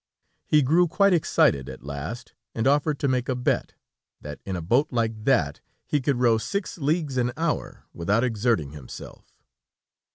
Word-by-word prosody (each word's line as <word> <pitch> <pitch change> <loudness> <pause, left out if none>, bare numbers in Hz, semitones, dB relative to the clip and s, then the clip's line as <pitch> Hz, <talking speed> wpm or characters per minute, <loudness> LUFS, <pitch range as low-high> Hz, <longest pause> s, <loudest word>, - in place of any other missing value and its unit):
He 150 -1 +4
grew 170 +7 +4
quite 195 +3 +3
excited 70 - +2
at - - -10
last, 75 - -6 0.2
and 115 - -1
offered 145 +2 +2
to 140 - -1
make 130 0 0
a 130 - +1
bet, 125 0 -1 0.4
that 75 -1 -8
in 95 - -2
a 85 - -3
boat 125 - +2
like 115 -3 -2
that, 90 - +2 0.2
he 150 - 0
could 135 -1 0
row 115 -3 +4
six 200 - -4
leagues 150 -2 0
an 125 0 +1
hour, 165 -1 -2
without 100 +7 +1
exerting 115 - 0
himself. 75 -4 -11
125 Hz, 165 wpm, -25 LUFS, 105-145 Hz, 0.4 s, He